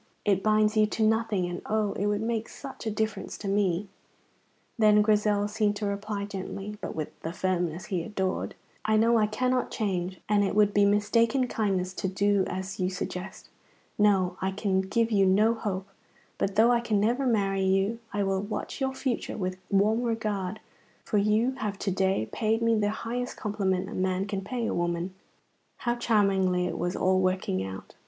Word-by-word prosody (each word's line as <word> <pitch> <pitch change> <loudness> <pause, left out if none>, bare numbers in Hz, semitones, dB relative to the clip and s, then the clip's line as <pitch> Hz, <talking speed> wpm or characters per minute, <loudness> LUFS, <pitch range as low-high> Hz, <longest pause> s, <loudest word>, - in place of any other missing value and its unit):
It 195 -2 +3
binds 215 0 +3
you 215 -1 +4
to 220 - -1
nothing, 220 -3 +2
and 175 0 -4
oh, 215 -2 0
it 205 - -1
would 205 +1 0
make 225 -1 -2
such 270 -4 -8
a - - +2
difference 215 -1 -3
to 205 - -6
me." 195 -1 +1 0.9
Then 210 -1 +6
Grizel 210 -1 +2
seemed 210 -1 0
to 205 0 -3
reply 200 0 -3
gently, 200 +1 -6
but - - -5
with 155 -2 -5
the 165 - -4
firmness 180 -1 -1
he 185 -3 -2
adored: 190 +1 -2 0.3
"I 215 0 +2
know 230 +1 +4
I 210 - +3
cannot 250 +4 0
change, 185 -4 -2
and 205 -1 +3
it 195 - -1
would 205 -1 +4
be 205 0 +5
mistaken 230 +5 +2
kindness 190 -5 -1
to 190 - -2
do 200 +1 +2
as 190 +1 -5
you 185 0 +1
suggest. 185 0 -6 0.5
No, 190 -3 +3
I 190 - +1
can 190 -1 0
give 230 +4 0
you 195 -2 +4
no 210 +4 +4
hope; 200 -4 -3 0.5
but 195 0 -1
though 230 +3 +5
I 240 - +4
can 225 -3 0
never 245 +6 +1
marry 195 -4 +1
you, 195 +4 +1
I 205 0 0
will 195 -1 0
watch 210 +6 -5
your 265 0 0
future 260 -3 -2
with 185 -2 -2
warm 210 +4 +3
regard, 215 -4 -2 0.4
for 210 - +1
you 215 +5 +2
have 205 -2 -2
to 195 - -2
day 190 - +1
paid 225 +1 0
me 230 0 +3
the 210 -2 +2
highest 240 +3 -4
compliment 195 -4 -1
a 215 - -7
man 185 0 0
can 200 -1 -3
pay 235 +4 -3
a - - -1
woman." 175 +1 -1 0.6
(How 240 - 0
charmingly 195 -6 +2
it - - -3
was 175 +2 -1
all 185 0 +2
working 185 - 0
out!) 95 0 -8
205 Hz, 190 wpm, -28 LUFS, 190-220 Hz, 0.9 s, Then